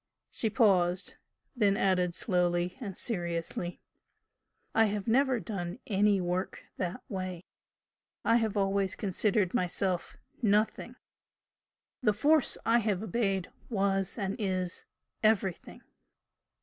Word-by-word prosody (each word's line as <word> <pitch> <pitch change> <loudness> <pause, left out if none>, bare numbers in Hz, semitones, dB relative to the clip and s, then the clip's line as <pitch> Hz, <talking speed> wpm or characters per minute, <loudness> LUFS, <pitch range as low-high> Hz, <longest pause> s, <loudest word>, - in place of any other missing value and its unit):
She 225 - -1
paused, 190 -5 +2 0.4
then 205 -4 +3
added 180 -3 +2
slowly 175 -2 0
and 200 -6 -5
seriously 175 -3 -2 0.9
"I 225 - +5
have 205 0 -2
never 260 +1 +3
done 175 -1 -5
any 205 -1 +3
work 180 +1 -2
that 185 +6 -3
way. 185 -5 -5 0.8
I 230 - +5
have 220 -3 0
always 195 -1 +1
considered 200 -1 0
myself 180 0 -1 0.2
Nothing, 215 -1 +1 1.1
the 215 -5 +3
Force 290 +6 +3
I 235 +1 +4
have 210 -3 -1
obeyed 195 -5 -1 0.2
was 195 -3 0
and 195 -3 -2
is 185 -3 -2 0.4
Everything." 210 -5 0
195 Hz, 110 wpm, -30 LUFS, 180-220 Hz, 1.1 s, I